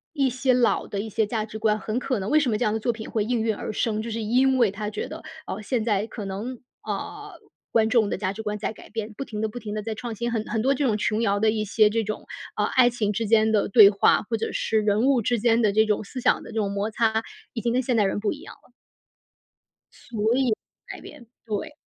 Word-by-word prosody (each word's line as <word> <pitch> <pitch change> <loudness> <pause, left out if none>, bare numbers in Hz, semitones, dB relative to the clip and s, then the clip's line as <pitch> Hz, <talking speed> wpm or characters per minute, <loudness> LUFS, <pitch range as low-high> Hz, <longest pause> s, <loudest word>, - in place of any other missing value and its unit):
一 275 -3 +2
些 255 +1 +1
老 250 -1 +2
的 200 - -4
一 220 - -4
些 220 0 0
价 215 0 -2
值 215 0 -8
观， 215 -1 +2
很 215 +3 -3
可 255 -1 -1
能 195 +1 -4
为 305 - +5
什 290 -5 +1
么 215 - 0
这 245 - 0
样 210 - +1
的 - - 0
作 240 - 0
品 220 -1 -8
会 215 -2 0
应 240 +1 0
运 220 0 +1
而 205 - -5
生， 215 0 -1
就 230 - -5
是 230 +1 -3
因 255 +4 +3
为 235 -5 +4
它 210 +1 -5
觉 210 - -4
得， 315 +1 -8 0.2
哦， 195 - -5
现 235 +2 -1
在 210 -2 +1
可 220 -2 -7
能， 220 +6 -5 0.2
呃， - - -5 0.4
观 220 -1 +3
众 225 -3 +3
的 - - -2
价 190 - -1
值 215 +2 -7
观 210 -1 -3
在 210 - -3
改 - - -15
变， 220 -1 -5
不 275 - -4
停 215 -5 -6
的 220 - 0
不 215 - -7
停 210 -3 -6
的 215 - -3
在 220 +1 -4
创 240 0 -5
新， 235 +3 -2
很 225 -2 -1
很 225 0 -1
多 270 +5 +2
这 280 - -1
种 215 -4 +1
琼 215 +1 0
瑶 200 -2 +1
的 220 0 +4
一 215 -1 -1
些 215 +1 +4
这 225 +1 -1
种， 215 +1 -5 0.3
呃， - - +1
爱 250 -1 +4
情 215 -4 -1
之 225 +2 -2
间 220 0 +4
的 210 - +2
对 205 -1 +9
话， 200 0 +3
或 230 - 0
者 225 - -3
是 220 -1 0
人 210 +1 +2
物 265 -3 +3
之 240 +2 +1
间 235 +1 +3
的 210 -2 +3
这 220 +2 +4
种 215 0 0
思 255 +6 -7
想 - - +2
的 - - -10
这 - - -8
种 205 -3 0
摩 200 +2 -2
擦 220 0 +1 0.3
已 235 - -3
经 235 - +1
跟 250 - +2
现 250 -1 0
代 215 - +4
人 195 - -1
不 210 - 0
一 - - -9
样 - - -11
了。 - - -27 1.4
所 225 +1 +1
以 260 -4 +2 0.3
改 - - -8
编， - - -12 0.2
对。 220 +6 -4
220 Hz, 295 characters per minute, -25 LUFS, 210-240 Hz, 1.4 s, 对